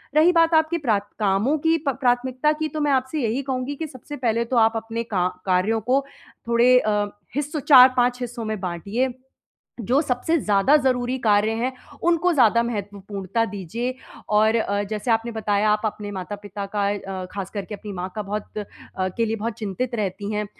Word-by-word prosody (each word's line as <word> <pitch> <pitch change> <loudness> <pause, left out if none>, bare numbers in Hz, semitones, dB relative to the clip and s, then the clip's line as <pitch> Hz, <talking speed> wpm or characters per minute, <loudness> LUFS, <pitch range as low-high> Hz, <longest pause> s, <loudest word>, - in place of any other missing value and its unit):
रही 320 +4 +6
बात 330 0 +4
आपकी 320 +1 +3
प्राथ 230 -10 +1 0.2
कामों 210 +9 +2
की 325 +2 +2
प - - +5
प्राथमिकता 255 +3 +2
की, 310 +1 -2
तो 310 - -5
मैं 295 - +2
आपसे 265 +2 0
यही 230 +3 0
कहूँगी 260 +1 -3
कि 315 +2 -4
सबसे 275 +1 -9
पहले 235 -2 0
तो 245 +1 -1
आप 225 0 +5
अपने 225 +1 -3
का 190 -6 0 0.2
कार्यों 190 +5 +1
को 270 +2 +2 0.4
थोड़े 240 +2 +5
अ, 210 -2 +1 0.3
हिस्सों 295 +2 -2
4-5 255 -2 +6
हिस्सों 240 -2 -5
में 215 -2 -3
बाँटिए। 200 +8 -2 0.8
जो 270 +4 +4
सबसे 290 +4 0
ज़्यादा 210 +5 +3
ज़रूरी 255 -2 0
कार्य 210 0 +3
हैं, 255 +2 0 0.3
उनको 345 +1 +3
ज़्यादा 235 -4 +4
महत्वपूर्णता 205 -1 -3
दीजिए 225 +6 -4 0.4
और 215 +2 +4
अ, 205 -2 0
जैसे 215 +2 -2
आपने 225 +1 +1
बताया, 210 -1 +1
आप 210 - +1
अपने 205 -1 -4
माता-पिता 200 +1 -6
का 205 - +1
अ, 195 -2 -5
ख़ासकर 195 0 -5
के 210 - -6
अपनी 205 +1 -9
माँ 180 +1 -4
का 215 - -2
बहुत 210 +1 -5
अ, 210 - -2 0.4
के 185 +5 0
लिए 225 0 -1
बहुत 225 +2 -3
चिंतित 230 +4 -3
रहती 200 0 -3
हैं। 210 0 -1
230 Hz, 185 wpm, -23 LUFS, 205-260 Hz, 0.8 s, रही